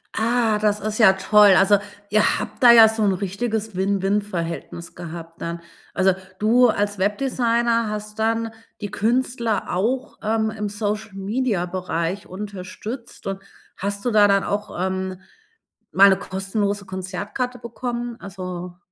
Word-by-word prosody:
Ah, 225 -1 +2
das 210 -1 +1
ist 215 +1 -3
ja 190 -4 +7
toll. 205 +1 +5
Also, 200 +2 +5 0.3
ihr 215 0 +3
habt - - -6
da 240 - +10
ja 225 -2 +9
so 220 0 -1
'n 200 -2 +3
richtiges 210 +3 -3
Win-Win 195 +2 +1
Verhältnis 170 -3 -6
gehabt 165 -1 -9
dann. 170 0 -4 0.3
Also, 190 0 +3 0.3
du 240 +3 +5
als 205 -1 -1
Webdesigner 230 +2 +1
hast 210 0 -6
dann 225 +1 0 0.3
die 205 - -4
Künstler 235 -3 0
auch, 240 +8 -1
ähm, 220 0 +1
im 210 -1 -4
Social-Media 205 0 -2
Bereich 180 +1 -3
unterstützt. 205 +5 -7
Und 195 0 -3 0.4
hast 200 +2 -4
du 245 - +1
da 210 -1 +6
dann 195 -1 +3
auch, 210 +1 -3
ähm, 185 0 -2 0.7
mal 200 +1 +7
'ne 190 - +3
kostenlose 200 +1 -2
Konzertkarte 200 +7 -4
bekommen? 240 0 -5
Also 180 -2 -7
205 Hz, 140 wpm, -22 LUFS, 190-225 Hz, 0.7 s, da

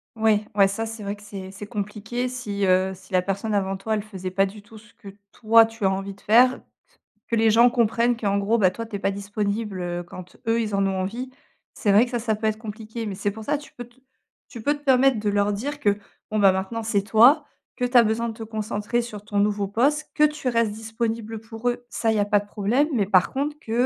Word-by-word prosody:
Ouais, 220 -1 +2
ouais 195 -1 +6
ça 220 +3 -3
c'est 225 -1 -7
vrai 200 +1 -3
que 205 - -18
c'est 195 -2 -8
c'est 200 +1 -9
compliqué 210 +3 -4
si, 210 -6 -3
heu, 185 0 +3
si 190 - -17
la 185 - +4
personne 200 +3 -3
avant 195 -1 0
toi, 220 +3 -3
elle 215 - 0
faisait 190 -3 -7
pas 195 +1 +2
du 205 +1 -11
tout 215 +1 -14
ce 210 -1 -21
que 200 - -12 0.2
toi 225 0 +5
tu 225 -2 -5
as 190 - +4
envie 195 +1 -4
de 195 - -22
faire, 250 +4 +5 0.7
que 230 - 0
les 225 0 +4
gens 235 +3 +6
comprennent 235 0 +1
qu'en 200 -3 0
gros, 215 +4 +1
bah, 185 -2 +4
toi 230 +4 -6
tu 220 -2 -7
es - - -10
pas 195 - 0
disponible, 200 0 -3
heu, 175 0 -3
quand 180 +1 -12
eux, 230 +1 +2
ils 210 -2 -3
en 195 0 +2
ont 190 -1 -1
envie. 235 +7 -4 0.5
C'est 205 - +1
vrai 210 +5 +6
que 245 - -10
ça 240 - -1
ça 220 -2 0
peut 220 +1 -2
être 215 0 0
compliqué, 220 +1 -7
mais 200 - -4
c'est 205 +1 -1
pour 220 +1 -9
ça 295 0 +1
tu 290 - -14
peux 245 - -8
t 240 +1 -27 0.5
tu 235 - -9
peux 290 +4 +2
te 290 - -15
permettre 265 -3 +4
de 210 - -1
leur 205 0 +1
dire 280 +9 -4
que 205 -1 +2 0.3
bon, 215 - 0
bah, 195 -2 +6
maintenant, 195 +5 -3
c'est 215 -2 +1
toi, 240 +8 +6 0.3
que 250 - -3
tu 245 0 +3
as 235 - +8
besoin 230 +1 0
de 225 - -5
te 225 0 -8
concentrer 215 +1 -2
sur 210 -3 -9
ton 205 -1 -1
nouveau 205 -1 +1
poste, 280 +9 +1
que 300 - +3
tu 300 -2 -2
restes 230 -3 +1
disponible 225 0 -4
pour 225 +2 -3
eux, 245 0 -4
ça 225 -1 0
il - - 0
y - - +1
a 205 - +2
pas 205 0 +3
de 205 - -11
problème, 225 +9 +1
mais 210 -5 +2
par 185 -3 +3
contre 290 +2 -2
que, 225 - -9
215 Hz, 260 wpm, -24 LUFS, 200-235 Hz, 0.7 s, as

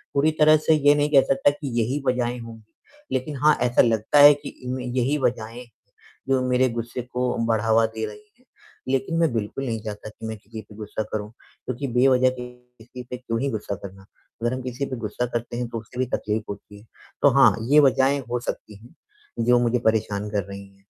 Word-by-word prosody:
पूरी 150 +3 +3
तरह 155 0 +7
से 160 - +6
ये 145 -1 +4
नहीं 145 0 +1
कह 135 - +8
सकता 135 +1 +3
कि 145 0 -7
यही 130 +6 -1
वजहें 125 -1 0
होंगी, 115 -1 -10 0.5
लेकिन 130 +3 -2
हाँ, 150 +2 +4
ऐसा 120 0 +4
लगता 115 +4 +2
है 145 +1 +10
कि 145 0 -8 0.2
इनमें 125 0 -4
यही 125 +3 0
वज़हें, 120 -1 -2 0.6
जो 135 -1 +3
मेरे 125 +1 +3
गुस्से 120 +1 -4
को 125 +1 -2
बढ़ावा 115 0 +3
दे 110 0 -4
रही - - -9 0.2
हैं। 255 - -29 0.4
लेकिन 135 +5 0
मैं 165 -5 +3
बिल्कुल 115 +5 -3
नहीं 115 -2 -2
चाहता 105 0 -7
कि 110 - -11
मैं 110 -1 -5
किसी 110 +2 -10
पे 105 - -16
गुस्सा 110 0 -4
करूँ, 105 -1 -3 0.4
क्योंकि 130 +2 -3
बेवज़ह 130 0 +4
के 125 -1 -7
किसी 125 0 -13
पे 125 - -5
क्यों 115 -2 -3
ही 140 - 0
गुस्सा 105 -2 -4
करना। 95 0 -10 0.4
अगर 120 +1 0
हम 130 - -4
किसी 130 +2 -3
पे 130 - -5
गुस्सा 115 +2 -3
करते 120 0 -3
हैं, 120 0 -2
तो 115 - -4
उसे 120 +3 -11
भी 130 - +2
तकलीफ़ 110 +1 -2
होती 100 0 -9
है। 105 - -19 0.4
तो 145 - +8
हाँ, 135 - +7 0.2
ये 150 - +8
वज़हें 135 +1 +3
हो 125 - 0
सकती 110 -3 -6
हैं, 120 +8 -17 0.5
जो 120 0 +5
मुझे 120 0 +1
परेशान 105 -2 0
कर 100 -3 0
रही 100 0 -8
हैं। 100 0 -24
125 Hz, 210 wpm, -24 LUFS, 110-135 Hz, 0.6 s, है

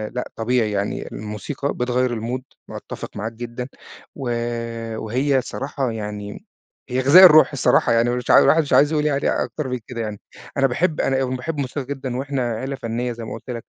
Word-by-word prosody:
لأ 125 - -4
طبيعي 115 -1 +1
يعني 100 0 -2
الموسيقى 105 +7 -4
بتغيّر 125 -1 0
الMood 125 +3 -3 0.3
باتّفق - - -8
معاك 110 +2 -3
جدًا، 120 +2 -6 0.5
و 135 -4 -4 0.7
وهي 130 +5 +1
صراحة 135 -2 -3
يعني، 105 - -6 0.4
هي 125 +1 0
غذاء 145 +8 +8
الروح 155 -3 +7
الصراحة 140 -4 +3
يعني 115 +1 +3
مش 125 0 -1
عا - - +9
الواحد 165 - +5
مش 145 - -3
عايز 145 +2 +5
يقول 150 -1 +1
يعني 145 -2 +1
أكتر 150 -4 -5
من 125 -1 -3
كده 120 -2 -5
يعني، 105 -2 -5 0.4
أنا 135 -1 +4
باحب 155 +6 0
أنا 135 0 +1
باحب 130 +5 -4
موسيقى 140 0 -3
جدًا 130 -2 -4
وإحنا 135 -3 -2
عيلة 130 +5 -4
فنية 120 -1 -3
زي 115 -1 -7
ما 110 - -6
قُلت 115 - -10
لك، 115 -2 -5
125 Hz, 185 wpm, -22 LUFS, 115-140 Hz, 0.7 s, عا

